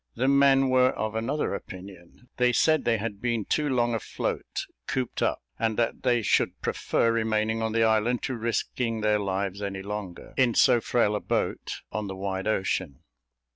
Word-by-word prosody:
The 130 - 0
men 135 -1 +5
were 130 0 +5
of 110 0 -3
another 115 +6 -1
opinion. 95 +3 -10
They 125 0 +3
said 155 +4 +3
they 115 -1 +3
had 105 -1 -5
been 120 -4 -1
too 150 -1 0
long 120 -2 +1
afloat, 115 - -3 0.2
cooped 130 -2 -2
up, - - 0 0.2
and 110 -1 0
that 115 -1 0
they 120 -3 +2
should - - +1
prefer 115 - 0
remaining 110 0 0
on 110 0 -1
the 115 +1 +2
island 110 +2 +2
to 130 - -2
risking 115 0 -2
their 105 0 +2
lives 100 0 -2
any 95 -1 -4
longer, 100 -3 -6
in 125 -3 +3
so 120 - +5
frail 110 -4 +1
a - - 0
boat, - - -2
on 105 -1 -3
the 95 - -5
wide 95 +1 -3
ocean. 95 -8 -1
110 Hz, 175 wpm, -27 LUFS, 100-125 Hz, 0.2 s, men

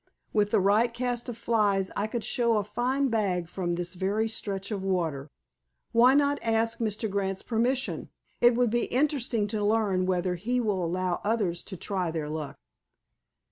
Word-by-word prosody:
With 210 -1 +2
the - - +3
right 210 +5 +3
cast 240 0 -3
of 235 - -6
flies 205 -5 +1
I 205 - 0
could 230 0 -3
show 235 -2 +2
a 210 - +1
fine 250 +6 0
bag 190 -6 0
from 175 -1 -2
this 175 +1 -3
very 200 +4 0
stretch 200 -2 -4
of 200 -2 -2
water." 165 -7 -1 0.6
"Why 245 +3 +6
not 285 0 +3
ask 225 0 +1
Mr. 220 -1 -1
Grant's 195 -1 -2
permission? 245 +3 0 0.3
It 240 0 +5
would 245 -2 +2
be 240 0 +1
interesting 255 -5 0
to 210 0 -1
learn 205 -4 +2
whether 180 -1 0
he 245 +8 -1
will 205 -6 0
allow 180 +1 -1
others 205 -5 0
to 190 - -7
try 185 -1 -2
their 160 -2 -3
luck." 155 -2 -5
210 Hz, 175 wpm, -28 LUFS, 185-235 Hz, 0.6 s, Why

